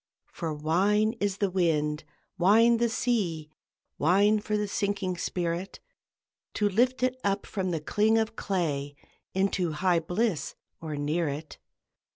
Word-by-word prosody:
For 165 -2 -3
wine 195 +9 +2
is 200 -1 -1
the 200 -2 0
wind, 155 -4 0 0.3
wine 220 +6 +5
the 235 0 +1
sea, 180 -11 -1 0.5
Wine 200 +7 +4
for 210 0 -2
the 210 0 -1
sinking 200 -2 -1
spirit, 175 +2 -3 0.8
To 210 - +2
lift 245 +6 +1
it 255 0 +1
up 200 0 0
from 190 -3 -3
the 165 -3 -2
cling 215 +7 +2
of 225 0 0
clay 145 -7 -2 0.4
Into 190 -3 0
high 175 +2 +2
Bliss 175 -2 -1 0.3
or 155 -2 -4
near 150 +3 -1
it! 150 +2 -7
190 Hz, 140 wpm, -28 LUFS, 160-210 Hz, 0.8 s, wine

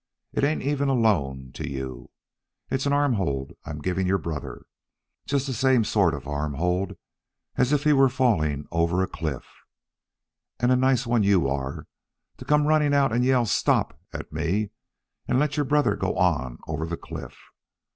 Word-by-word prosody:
It - - -1
ain't 150 +2 +1
even 140 0 0
a 135 - +2
loan 70 - +1
to - - -5
you. 65 -2 -6 0.6
It's 130 +1 0
an - - +1
arm 145 -2 +3
hold 70 - -2
I'm 75 - -6
giving 95 +2 -1
your 95 +1 +3
brother 80 -4 -6 0.6
just 140 -1 0
the 135 - -3
same 130 0 +3
sort 100 -7 +2
of 70 - -9
arm 75 0 -2
hold 90 +4 -1 0.6
as 125 +2 +2
if 145 -1 +2
he 150 -1 +4
was 135 -2 +5
falling 80 - +1
over 85 +2 +1
a - - -1
cliff. 75 -6 -4 1.1
And 120 +1 +2
a - - +5
nice 130 0 +2
one 120 -1 +2
you 100 -7 +3
are, 65 0 -3 0.5
to - - -10
come 150 0 +3
running 150 -1 +3
out 135 -3 +3
and 120 +1 +2
yell 125 -2 +3
'Stop!' 80 -6 +1
at - - -7
me, 100 +5 -1 0.6
and - - +2
let 150 +1 +1
your 145 -1 +1
brother 150 +1 +3
go - - -2
on 65 -1 +1
over 80 - -3
the 85 0 -4
cliff. - - -9
105 Hz, 180 wpm, -25 LUFS, -, 1.1 s, was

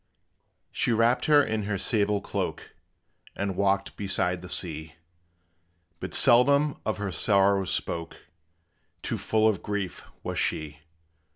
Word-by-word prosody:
She - - 0
wrapped 115 +2 +2
her 145 -1 +5
in 110 -2 -2
her 100 -1 -2
sable 105 -1 0
cloak, - - -4 0.6
And 100 -1 -3
walked 100 0 0
beside 90 -2 -1
the 90 - -10
sea; 80 -3 -3 1.0
But - - -4
seldom 140 +4 +4
of 110 - -1
her 100 -2 -3
sorrow 100 -1 +3
spoke, 85 -1 -3 0.9
Too - - -3
full 110 0 +2
of 105 -5 0
grief 100 -3 -4 0.2
was - - -3
she! 75 -1 -2
100 Hz, 125 wpm, -27 LUFS, 90-110 Hz, 1.0 s, her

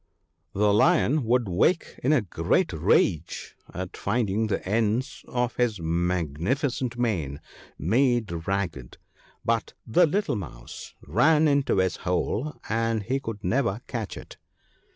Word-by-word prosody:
The 105 +1 +3
Lion 150 +2 +3
would 120 0 +2
wake 100 - +1
in 135 - +3
a 145 -7 +3
great 95 - 0
rage 80 +1 +1 0.2
at 90 0 -6
finding 110 0 0
the 95 -3 -2
ends 115 +6 0
of 125 0 -1
his 120 -5 +1
magnificent 90 - -1
mane 85 - -1 0.4
made 110 - +1
ragged, 90 -11 -3 0.5
but 115 -1 0
the 170 +10 +4
little 195 -2 0
mouse - - -9
ran 160 0 +4
into 140 -7 +2
his 95 -1 +1
hole, 105 +10 -1
and 115 0 0
he 130 +6 -1
could 110 -5 -6
never 115 -4 0
catch 115 -4 -5
it. - - -11
110 Hz, 130 wpm, -26 LUFS, 95-125 Hz, 0.5 s, the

